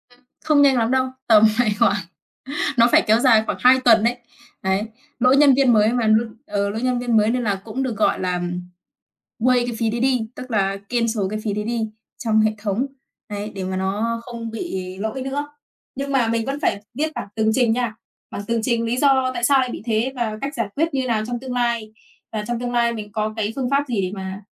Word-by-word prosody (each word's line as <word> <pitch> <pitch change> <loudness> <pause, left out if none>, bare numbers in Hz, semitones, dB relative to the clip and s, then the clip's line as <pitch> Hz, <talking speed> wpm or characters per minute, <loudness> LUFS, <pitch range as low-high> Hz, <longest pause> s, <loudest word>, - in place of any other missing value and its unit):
Ừm. - - -29 0.3
Không 305 -2 +4
nhanh 275 -2 +5
lắm 230 0 +1
đâu, 260 0 +2 0.2
tầm 220 -2 +6
phải 240 -3 +3
khoảng - - +4 0.8
nó 235 0 +6
phải - - +5
kéo 220 +2 +5
dài 230 -4 +5
khoảng - - -2
2 255 +1 +6
tuần 225 -3 +6
đấy. 240 +2 +1 0.5
Đấy. 190 +2 +1 0.4
Lỗi 255 +2 +4
nhân 285 -1 +6
viên 265 -2 +4
mới 215 +1 +4
mà 240 -3 +1
lỗi 220 +2 +3 0.2
ừ, 200 -6 -1
lỗi 220 +3 -4
nhân 250 -1 0
viên 240 -2 +1
mới 215 0 +3
nên 250 0 -1
là 200 -3 -1
cũng 230 +4 -3
được, 240 -5 -3
gọi 215 - +2
là 180 -1 -1 1.0
waive, 245 +1 +3
cái 240 - -3
phí 225 -1 +1
đấy 235 +2 -2
đi, 250 -4 +1
tức 255 0 -8
là 195 -2 +1
cancel 230 -3 0
cái 215 - -2
phí 210 - -1
đấy 210 +1 -2
đi 230 -1 -1 0.3
trong 220 -2 +2
hệ 215 0 +3
thống. 210 +4 -1 0.4
Đấy, 205 +1 -5
để 195 - -4
mà 185 0 -3
nó 210 +5 -1
không 230 -2 -6
bị 190 - -5
lỗi 220 +5 -3
nữa. 280 +2 -3 0.5
Nhưng 275 +1 -4
mà 260 -4 +2
mình 225 0 0
vẫn 275 +2 -3
phải 200 - 0
viết 310 +5 -1
bản - - -5
tường 220 0 +2
trình 245 -1 +3
nha. 240 -2 -2 0.4
Bản - - -5
tường 230 0 0
trình 235 -1 0
lý 235 +2 -1
do 265 -2 +3
tại 240 - -5
sao 275 +2 +5
lại 255 -1 0
bị - - -6
thế 230 +3 0
và 225 -4 -2
cách 280 +2 -3
giải 230 -3 -1
quyết 325 +2 0
như 265 -2 -1
nào 220 -3 0
trong 240 0 -3
tương 255 0 -6
lai. 235 -3 -1 0.4
Và 215 -1 -3
trong 240 -1 -2
tương 245 0 -3
lai 235 -1 +2
mình 210 -2 -7
có 215 0 -2
cái 215 0 -1
phương 260 -2 -2
pháp 280 +1 +2
gì 230 -6 -1
để 185 -1 -2
mà 190 0 -6
230 Hz, 240 wpm, -21 LUFS, 215-255 Hz, 1.0 s, tầm